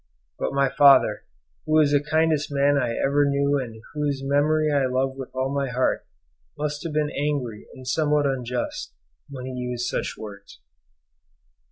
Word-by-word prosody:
But - - -1
my 140 0 +3
father, 135 -5 +5 0.4
who 155 - 0
was 155 -2 +5
the 145 0 +3
kindest 155 -1 +1
man 140 0 +3
I 120 -4 0
ever 145 +1 +2
knew 140 0 +1
and 115 -4 -7
whose 145 -2 -2
memory 150 +2 +2
I 140 -2 +2
love 130 +1 0
with 135 -1 -7
all 130 +1 -1
my 140 -1 -1
heart, 125 +1 0 0.5
must 150 0 -3
have 165 - -3
been 150 -1 0
angry 140 -7 -3
and 130 -1 -11
somewhat 150 +2 +2
unjust 125 - -3 0.3
when 130 -2 -7
he 130 - -5
used 125 -1 -3
such - - -2
words. 100 -2 -10
140 Hz, 165 wpm, -24 LUFS, 130-145 Hz, 0.5 s, father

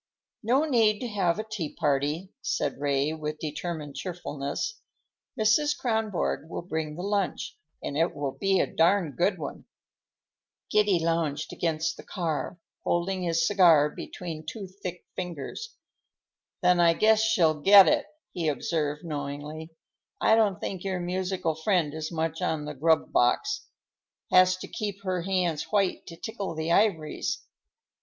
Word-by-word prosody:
"No 255 +7 +2
need 225 -7 +3
to 250 - -2
have 195 -5 +1
a 215 - -2
tea 215 -9 -5
party," 150 +4 0
said 140 - -1
Ray 140 +1 +1
with 155 -1 -4
determined 155 -1 -5
cheerfulness. 170 - -4 0.6
"Mrs. 255 +8 +3
Kronborg 220 - -1
will - - -5
bring 160 -3 -3
the 175 - -6
lunch, 200 -1 -1 0.3
and 140 - -4
it 165 +3 +1
will 145 -2 -2
be 195 +5 +1
a - - +3
darned 165 -4 +2
good - - +1
one." - - -7 1.1
Giddy 210 -3 +4
lounged 165 -3 -1
against 165 0 -1
the - - -10
car, 165 -4 -3 0.3
holding 185 +2 0
his 165 -2 +1
cigar 165 -7 +5
between 160 -2 -7
two 195 +6 -6 0.2
thick 180 -2 -6
fingers. 180 - -6 0.9
"Then 180 0 +5
I 170 -1 +6
guess 220 +2 +4
she'll 170 -9 +3
get 195 +3 +9
it," 295 -1 +2 0.3
he 170 -3 -2
observed 150 +1 -1
knowingly. 150 +1 -5 0.5
"I - - +4
don't 215 -4 +3
think 185 -2 -4
your 190 -2 -2
musical 180 -1 -1
friend 160 -2 +1
is 155 +1 -4
much 160 -1 -2
on 155 -2 -1
the 150 - -5
grub 160 +3 +2
box. 410 - +1 0.6
Has 185 0 +6
to - - -8
keep 200 -2 -5
her 185 -2 -1
hands 175 -4 0
white 195 +2 0
to 165 - -9
tickle 200 -5 -5
the 160 +1 -2
ivories." 175 - +1
170 Hz, 150 wpm, -27 LUFS, 155-195 Hz, 1.1 s, get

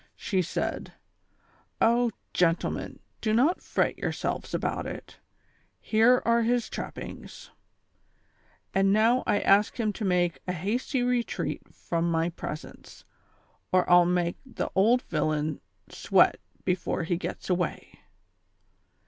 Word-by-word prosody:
She 190 -4 -1
said: 170 - -3 0.4
" - - -36
Oh, 235 +1 +3 0.2
gentlemen, 170 -1 0 0.2
do 215 -1 0
not 275 +11 +3
fret - - -1
yourselves - - -3
about - - -2
it, - - -9 0.6
here 230 +3 +3
are 235 0 +3
his 235 +1 +1
trappings; - - -8 1.2
and 195 0 +3
now 225 +5 +3
I 205 - +2
ask 205 +4 +3
him 215 -2 0
to 220 - -6
make 180 -3 +1
a 180 - -1
hasty 235 - -1
retreat 245 -1 -1
from 170 0 -2
my 165 0 +1
presence, 155 -2 -9 0.7
or 185 0 +3
I'll 175 0 +6
make 175 -1 0
the 260 -3 -5
old 230 +6 +3
villain 155 0 -1 0.3
sweat - - +3 0.3
before 180 -1 -1
he 175 +2 0
gets 170 - -5
away." 180 -2 -2
195 Hz, 125 wpm, -27 LUFS, 175-235 Hz, 1.2 s, I'll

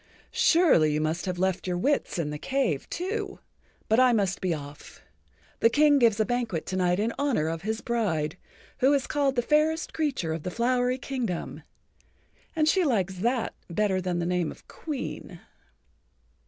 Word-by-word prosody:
"Surely 320 - +4
you 150 - 0
must 160 +4 -2
have 180 -1 -2
left 190 0 -1
your 180 -1 -1
wits 280 +2 0
in 155 -3 -2
the 150 - -5
cave 260 - -1
too. 400 +4 -3 0.5
But 220 +2 +3
I[Pg 255 - +7
59] - - +3
must 195 -3 0
be 185 -2 0
off. 145 -2 -8 0.6
The 230 - +5
King 290 +2 +4
gives 225 -4 +3
a 220 - +3
banquet 230 -8 -2
to 185 - -4
night 180 0 +1
in 225 +2 0
honor 275 - +1
of 165 0 -3
his 220 +4 -3
bride, 175 -10 -1 0.4
who 270 +3 +4
is 275 -2 +1
called 280 -2 0
the 240 - +1
Fairest 310 +4 +1
Creature 270 - -1
of 160 - -4
the 180 - -4
Flowery 245 +4 +1
Kingdom. 245 -9 -4 0.9
And 310 -1 +2
she 375 +3 +3
likes 195 - 0
that 235 +5 0 0.2
better 190 +1 0
than 180 -1 -2
the 170 - -1
name 180 -2 0
of - - -12
Queen." 290 -5 -6
220 Hz, 180 wpm, -27 LUFS, 175-270 Hz, 0.9 s, I[Pg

